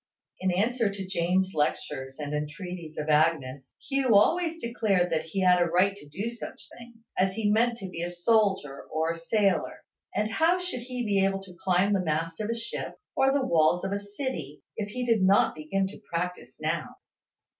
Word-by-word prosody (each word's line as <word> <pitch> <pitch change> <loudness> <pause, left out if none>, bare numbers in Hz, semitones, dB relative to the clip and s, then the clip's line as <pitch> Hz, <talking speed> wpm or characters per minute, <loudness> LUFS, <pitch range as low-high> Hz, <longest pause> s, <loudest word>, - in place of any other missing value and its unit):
In 185 - 0
answer 225 +4 +1
to 195 -1 -5
Jane's 185 +1 +1
lectures 135 -3 -2
and 150 -1 -4
the - - +1
entreaties 160 +1 -6
of 150 - -3
Agnes, 150 -4 +1 0.2
Hugh 270 -5 +2
always 330 - +3
declared 215 - +1
that 160 -1 0
he 175 +4 -2
had 180 -1 +5
a - - +5
right 185 +4 +2
to 150 -7 -14
do 195 +9 -4
such 235 - -9
things, 235 -1 -15
as 190 0 +3
he 210 -2 +1
meant 235 +2 +3
to 195 - -6
be 170 -2 -6
a 175 - -2
soldier 190 -5 +1
or 160 +1 -1
a - - -3
sailor; 195 +3 0 0.3
and 210 +1 0
how 325 +8 +3
should 360 -7 -3
he 250 0 -4
be 200 -2 +2
able 195 0 0
to 185 -2 -12
climb 190 +2 +3
the 195 - +2
mast 165 +2 -2
of 215 - -3
a 230 - 0
ship, 230 0 -5 0.2
or 270 0 +4
the 275 -1 +1
walls 165 -2 +3
of 195 - -2
a 200 - 0
city, 205 - -5
if 210 -1 -3
he 250 +4 -3
did 230 -4 +3
not 190 +1 +4
begin 175 +6 -1
to 195 +2 -8
practise 170 -7 -3
now? 155 +1 -2
190 Hz, 200 wpm, -28 LUFS, 165-225 Hz, 0.3 s, had